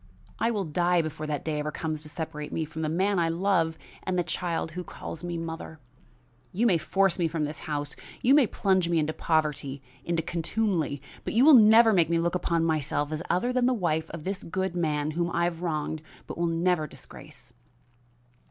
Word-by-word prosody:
"I 230 - +2
will 210 -4 -1
die 175 +2 +2
before 155 0 -5
that 150 -2 -3
day 155 -2 -1
ever 150 +1 -2
comes 155 0 -3
to 150 - -9
separate 150 -2 -5
me 160 - -1
from 160 +1 -7
the 155 - -1
man 190 +4 +1
I 165 -1 +2
love 165 -2 +1 0.2
and 185 -1 -2
the 175 - +2
child 170 -1 -2
who 180 +3 -5
calls 165 -1 -8
me 175 -1 -3
mother. 165 -1 -6 0.7
You 205 +6 0
may 185 -8 +4
force 195 +2 +2
me 170 - +2
from 160 -1 -2
this 150 +1 -4
house, 145 -1 -3 0.3
you 255 - +5
may 280 -5 +6
plunge 190 -3 +1
me 170 - +2
into 155 0 +1
poverty, 150 -4 -1 0.2
into 170 -1 -1
contumely, 170 -4 -1 0.2
but - - -4
you 245 +4 +6
shall 310 - +9
never 225 -1 +8
make 170 -4 +3
me 170 - +2
look 170 +1 0
upon 170 -2 +1
myself 150 -2 0
as 155 0 -3
other 245 +8 +1
than 250 -1 +3
the 255 - +2
wife 160 -6 -1
of 165 -2 -7
this 195 +2 -3
good 190 +1 -3
man, 155 -3 0
whom 170 +2 -1
I 170 - +2
have 170 -1 -1
wronged 155 -2 -2 0.2
but - - -7
will 170 0 0
never 165 -1 +1
disgrace." - - -13
165 Hz, 205 wpm, -27 LUFS, 155-185 Hz, 0.7 s, shall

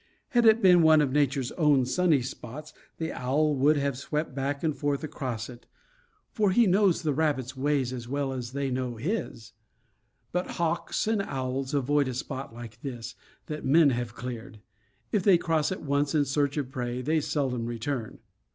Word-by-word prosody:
Had 240 -5 +4
it 220 0 +5
been 180 -2 +7
one 160 -1 +6
of 145 -3 +2
Nature's 140 -2 +1
own 145 -5 +4
sunny 155 -1 +2
spots, 135 +3 -8 0.2
the 160 -1 -3
owl 150 +4 +1
would 145 +3 +4
have 140 -2 -1
swept 150 0 -3
back 140 +2 -2
and 155 -3 0
forth 145 0 -1
across 130 -7 -4
it; 120 -1 -13 0.6
for 210 -3 +2
he 230 +5 +4
knows 190 -2 +3
the 150 -2 +1
rabbits' 140 -4 0
ways 135 -2 0
as 120 -2 -6
well 140 0 -2
as 125 -1 -5
they 140 -1 -2
know 125 -1 -2
his. 135 - -4 0.8
But 180 +1 -1
hawks 170 -1 -1
and 220 -1 +1
owls 135 -4 -3
avoid 140 +1 +2
a 130 - -3
spot 130 +1 -5
like 115 0 -10
this, 120 -5 -6 0.3
that 150 0 -6
men 150 +1 +5
have 120 -2 -3
cleared. 120 -2 -7 0.5
If 210 - +2
they 185 -1 +5
cross 160 -2 0
it 190 - -4
once 140 +1 0
in 145 -2 +3
search 140 +1 0
of 135 -3 -2
prey, 125 -2 -3
they 155 +3 +1
seldom 130 -6 -1
return. 120 0 -4
140 Hz, 180 wpm, -27 LUFS, 125-155 Hz, 0.8 s, been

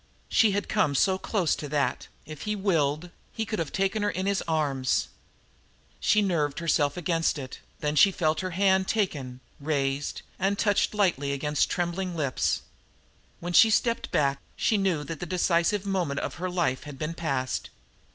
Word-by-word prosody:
She 225 - +4
had 205 +1 -1
come 180 -10 +1
so 190 +6 +3
close 190 -7 0
that, 145 -1 -1 0.2
if 155 -1 -9
he 210 0 -2
willed, 170 -4 0 0.2
he 225 - -2
could 215 -1 -3
have 165 -4 -2
taken 195 +3 0
her 205 - +1
in 190 -1 -3
his 200 0 +1
arms. 140 -5 0 0.9
She 210 -1 +3
nerved 155 -7 0
herself 165 -2 +1
against 165 -2 0
it; 130 -2 -7 0.2
then 150 0 -1
she 195 +6 +6
felt 155 -4 0
her 185 - -2
hand 190 +1 +2
taken, 140 - -2 0.2
raised 140 -1 -1 0.2
and 195 +2 +1
touched 205 0 +1
lightly 175 -9 +1
against 150 +1 0
trembling 175 +1 -2
lips. 140 -5 0 0.8
When 175 +1 -4
she 225 - +8
stepped 230 +2 +1
back 140 -1 +1 0.2
she 220 - +1
knew 190 -7 +1
that 160 0 -6
the 175 - -5
decisive 180 +3 +1
moment 180 -8 -1
of - - -3
her 185 - -1
life 170 -8 -1
had 145 -2 -8
been 155 +4 -3
passed. 135 -6 -2
170 Hz, 170 wpm, -27 LUFS, 145-195 Hz, 0.9 s, she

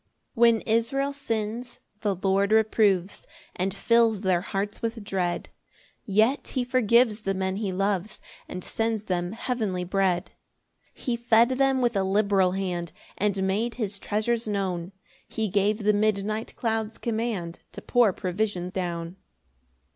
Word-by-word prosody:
1 235 - -6
When 220 - -4
Israel 250 +5 0
sins, 230 -2 -4 0.2
the 205 -3 0
Lord 195 +2 +1
reproves, 210 -4 +2 0.3
And 185 +2 -1
fills 225 +1 +3
their 185 -2 +2
hearts 200 +3 -3
with 230 -1 -3
dread; 185 -3 -2 0.6
Yet 220 +8 +2
he 255 - -1
forgives 235 -2 +3
the 195 -1 -1
men 190 0 -1
he 205 -2 -2
loves, 195 +1 -1 0.3
And 180 0 -6
sends 225 -1 -1
them 180 -2 -2
heavenly 220 -6 -2
bread. 185 -1 0 0.6
2 - - -17
He 245 - 0
fed 235 0 +4
them 265 0 +2
with 240 -2 +1
a 195 - +2
liberal 195 -1 +2
hand, 180 -3 -2 0.2
And 200 -1 0
made 215 +5 0
his 205 -4 -3
treasures 220 +3 -1
known; 190 -4 -2 0.4
He 220 -1 -2
gave 205 +2 +1
the 210 +1 +4
midnight 215 +1 0
clouds 225 -1 -2
command 220 -7 -3
To - - -7
pour 240 -5 +4
provision 185 -1 -2
down. 175 -1 -4
210 Hz, 145 wpm, -26 LUFS, 190-225 Hz, 0.6 s, fed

